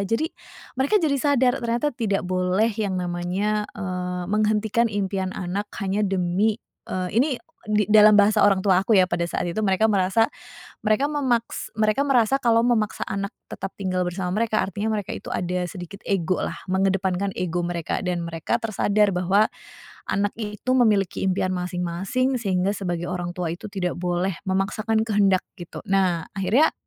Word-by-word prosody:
jadi 225 +10 0 0.5
mereka 285 +11 +3
jadi 310 -4 +2
sadar, 265 -2 +2
ternyata 235 +5 0
tidak 215 -5 -1
boleh 185 +4 +1
yang 205 -4 -1
namanya, 180 +4 -1
eee, 180 -2 -4
menghentikan 215 +3 +1
impian 195 -2 -1
anak 190 +3 -3
hanya 195 +1 -1
demi 195 +2 +1 0.3
eee, 185 -1 -2
ini, 260 +6 +4 0.4
di 210 -1 +1
dalam 215 0 +7
bahasa 210 +1 +5
orang 200 -1 +4
tua 190 -2 +4
aku, 195 - -7
ya, 185 - +6
pada 175 -1 -1
saat - - -2
itu, 195 +6 -2
mereka 195 +2 +3
merasa, 200 +2 +3 0.6
mereka 215 +6 +3
memaks 250 -6 -1
mereka 215 +3 +2
merasa 255 -1 +3
kalau 230 -1 +4
memaksa 220 -4 +1
anak 195 +1 -3 0.2
tetap 195 - -5
tinggal 185 -2 -1
bersama 180 0 -3
mereka, 220 -1 +1
artinya 200 +4 -2
mereka 205 -3 -4
itu - - -8
ada 180 0 -1
sedikit 180 +3 -9
ego, 185 -2 0
lah, - - -3 0.2
mengedepankan 190 0 0
ego 175 -1 -1
mereka 170 -2 -2
dan 175 -1 -1
mereka 165 +7 -1
tersadar 210 -1 +2
bahwa 185 +4 +3 0.7
anak 205 0 0
itu 210 +2 -4
memiliki 210 -6 +2
impian 185 0 0
masing-masing, 180 +8 -1
sehingga 195 -1 0
sebagai 175 -3 -3
orang 175 -1 -3
tua 175 -2 -3
itu 175 - -9
tidak 180 -3 -2
boleh 180 +1 -1
memaksakan 215 +3 0
kehendak, 200 -3 +3
gitu. 175 -3 -8
Nah, 185 -4 +2
akhirnya 210 +11 +3
195 Hz, 160 wpm, -24 LUFS, 180-215 Hz, 0.7 s, dalam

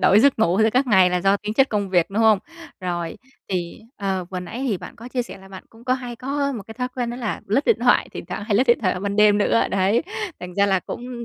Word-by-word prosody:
đổi 200 +3 +5
giấc 280 -2 +4
ngủ 190 -3 +2
giữa 220 - +4
các 255 +3 +2
ngày 190 -5 +5
là 180 0 0
do 195 +2 +3
tính 210 +1 -5
chất 270 +2 +4
công 205 -2 -1
việc, 175 -1 +2
đúng 210 +3 0
không? 220 -2 +5 0.4
Rồi, 175 -2 -3 0.3
thì, 180 0 -3 0.2
ờ, 190 -3 -2
vừa 185 -1 -4
nãy 180 +8 -7
hì 230 -8 0
bạn - - -10
có 235 +2 -10
chia 250 -1 -1
sẻ 240 - -10
là 195 0 -15
bạn 190 -1 -10
cũng 230 +2 -18
có 255 - +2
hay 245 -2 -6
có 280 +3 -2
một 220 -5 -5
cái 220 - -10
thói 250 0 -3
quen 245 -2 -2
đó 240 - -5
là 235 -4 -3
lướt 255 +9 +1
điện 465 - +4
thoại, - - +3
thỉnh - - -7
thoảng 210 - -5
hay 205 - 0
lướt 250 +6 +4
điện 240 - +4
thoại 185 -4 +1
vào 180 - -5
ban 200 0 -2
đêm 210 -1 +5
nữa, 220 +2 +3
đấy, 195 +6 +2 0.4
thành 180 0 -8
ra 200 0 +3
là 190 -2 +2
cũng 240 -1 -7
210 Hz, 290 wpm, -22 LUFS, 190-245 Hz, 0.4 s, đổi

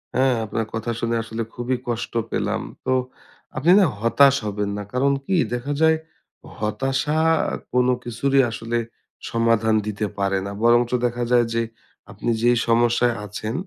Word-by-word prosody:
হ্যাঁ, 130 -1 +3
আপনার 110 +1 -2
কথা 115 +1 -2
শুনে 115 0 -1
আসলে 115 0 -5
খুবই 120 +1 -2
কষ্ট 115 -1 -3 0.2
পেলাম। - - -1 0.2
তো 130 - +2 0.6
আপনি 150 +7 +3
না 195 - +5
হতাশ 135 +5 +5
হবেন 105 -1 -2
না। 105 - -4
কারণ 135 +2 +2
কি? 190 - 0 0.2
দেখা 125 +4 -2
যায় 160 0 +5 0.6
হতাশা 135 +8 -1 0.3
আ - - -5 0.2
কোনো 125 0 +3
কিছুরই 135 +4 +2
আসলে 115 +2 -3 0.5
সমাধান 115 -1 +2
দিতে 105 0 -2
পারে 100 -1 +1
না। 100 - -4
বরঞ্চ 120 +1 +4
দেখা 120 0 -1
যায় 120 -1 +5
যে 115 - +1 0.5
আপনি - - -4
যেই 120 +1 +4
সমস্যায় 120 +1 +3
আছেন, 105 +2 -5
120 Hz, 155 wpm, -22 LUFS, 115-130 Hz, 0.6 s, না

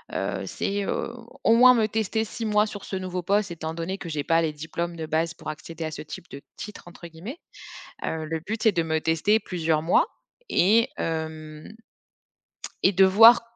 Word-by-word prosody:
heu, - - -2
c'est, 200 0 -2
heu, 235 - -2 0.3
au 225 - +5
moins 250 +1 +8
me 220 -2 +2
tester 220 0 -1
6 225 +1 -6
mois 210 -1 +3
sur 205 -2 -8
ce - - -5
nouveau 185 -1 -3
poste 200 +2 +1
étant 160 -1 -5
donné 175 +4 -4
que 170 - -7
j'ai 150 -3 -2
pas 165 +2 +3
les 160 - 0
diplômes 170 +3 -4
de 160 -1 -5
base 160 +2 -1
pour - - -8
accéder 160 +2 -7
à 155 - -4
«ce 150 - -6
type 155 +3 -9
de 140 - -8 0.2
titre» 210 -4 -9
entre 175 0 -12
guillemets. 175 - -9 0.7
Heu, 160 -1 -3
le 160 +1 -3
but, 215 +7 -5
c'est 220 - +6
de 175 -4 0
me 160 -1 0
tester 165 +7 +2
plusieurs 160 -6 -1
mois 170 - +3 0.4
et 220 +6 +4
hem 155 -1 -5 1.1
et 190 - +6
de 190 +1 +6
voir 225 +5 +8
170 Hz, 200 wpm, -25 LUFS, 160-210 Hz, 1.1 s, moins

